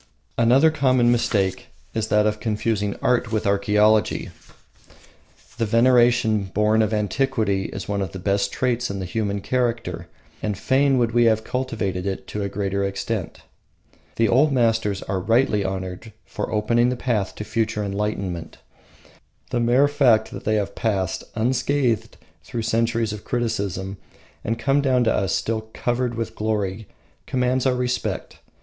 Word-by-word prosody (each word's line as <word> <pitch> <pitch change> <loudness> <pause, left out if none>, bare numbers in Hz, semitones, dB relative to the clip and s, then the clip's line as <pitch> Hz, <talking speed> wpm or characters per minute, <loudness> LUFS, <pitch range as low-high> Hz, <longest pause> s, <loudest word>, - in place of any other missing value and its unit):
Another 130 +7 +5
common 130 -5 +3
mistake 100 -5 0 0.3
is 110 -1 -1
that 105 0 +3
of 105 0 0
confusing 105 -2 -1
art 125 -2 +1
with 110 -2 -1
archaeology. 105 +2 +2 1.3
The 115 - +1
veneration 120 -2 +4
born 105 +3 +2
of 110 -1 +1
antiquity 105 -2 0
is 100 - -6
one 100 -1 -1
of 95 -3 -3
the 95 - -7
best 100 +1 0
traits 125 -1 -1
in 100 - -4
the 95 - -4
human 100 +1 -2
character, 115 -8 -2 0.3
and 105 -3 -2
fain 135 +4 +2
would 120 -2 +2
we 120 0 +3
have 110 -1 +4
it 110 - -14
cultivated 100 -7 -3
to 105 - -4
a 100 - -2
greater 100 0 -2
extent. 100 -1 -3 0.7
The 115 - +2
old 140 +8 +4
masters 115 -5 +1
are 95 -1 -2
rightly 115 +2 +2
to 95 - -1
be - - 0
honoured 95 +3 -6
for - - -5
opening 115 +3 +2
the 125 - -1
path 115 -6 -1
to - - -5
future 110 -1 -1
enlightenment. 100 -4 -3 0.9
The 125 - 0
mere 120 +4 +4
fact 130 -7 +3
that - - -8
they 110 - +2
have 100 -1 -1
passed 95 -4 -1
unscathed 125 0 0 0.3
through 115 - -4
centuries 115 -1 0
of 105 - -8
criticism 100 -5 -2 0.5
and 115 +2 -1
come 135 +4 +2
down 130 -3 +2
to 110 - +2
us 95 -4 0
still 110 -1 -2
covered 120 0 -1
with 115 -1 -4
glory 105 -2 -2 0.4
commands 125 0 +1
our 130 - +2
respect. 125 0 -3
110 Hz, 155 wpm, -23 LUFS, 100-120 Hz, 1.3 s, Another